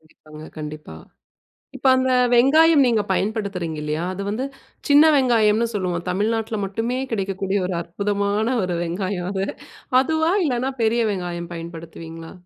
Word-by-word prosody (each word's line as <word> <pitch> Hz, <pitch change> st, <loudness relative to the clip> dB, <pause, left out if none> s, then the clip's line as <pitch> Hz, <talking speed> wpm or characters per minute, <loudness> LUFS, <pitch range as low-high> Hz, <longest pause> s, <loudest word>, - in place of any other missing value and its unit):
கண்டிப்பாங்க. 155 Hz, 0 st, -14 dB
கண்டிப்பா. 150 Hz, -, -7 dB, 0.8 s
இப்ப 270 Hz, -, -1 dB
அந்த 260 Hz, 0 st, +1 dB, 0.2 s
வெங்காயம் 295 Hz, +5 st, +6 dB
நீங்க 230 Hz, -3 st, +2 dB
பயன்படுத்துறீங்க 195 Hz, -5 st, -2 dB
இல்லயா! 150 Hz, +2 st, -2 dB
அது 200 Hz, +2 st, -5 dB
வந்து 230 Hz, +6 st, -2 dB, 0.4 s
சின்ன 290 Hz, +1 st, +7 dB
வெங்காயம்னு 230 Hz, -4 st, +3 dB
சொல்லுவோம். 180 Hz, -4 st, -2 dB
தமிழ்நாட்டுல 220 Hz, +4 st, -1 dB
மட்டுமே 225 Hz, +6 st, -2 dB
கிடைக்கக்கூடிய 195 Hz, -1 st, -1 dB
ஒரு 185 Hz, -, -3 dB
அற்புதமான 200 Hz, +4 st, -1 dB, 0.2 s
ஒரு 180 Hz, -1 st, -2 dB
வெங்காயம் 180 Hz, +1 st, -3 dB
அது. 195 Hz, -1 st, -1 dB, 0.6 s
அதுவா? 320 Hz, +4 st, +1 dB
இல்லன்னா 255 Hz, -1 st, -1 dB
பெரிய 230 Hz, +1 st, +2 dB
வெங்காயம் 175 Hz, -2 st, -5 dB
பயன்படுத்துவீங்களா? 165 Hz, -1 st, -9 dB
200 Hz, 125 wpm, -22 LUFS, 170-235 Hz, 0.8 s, சின்ன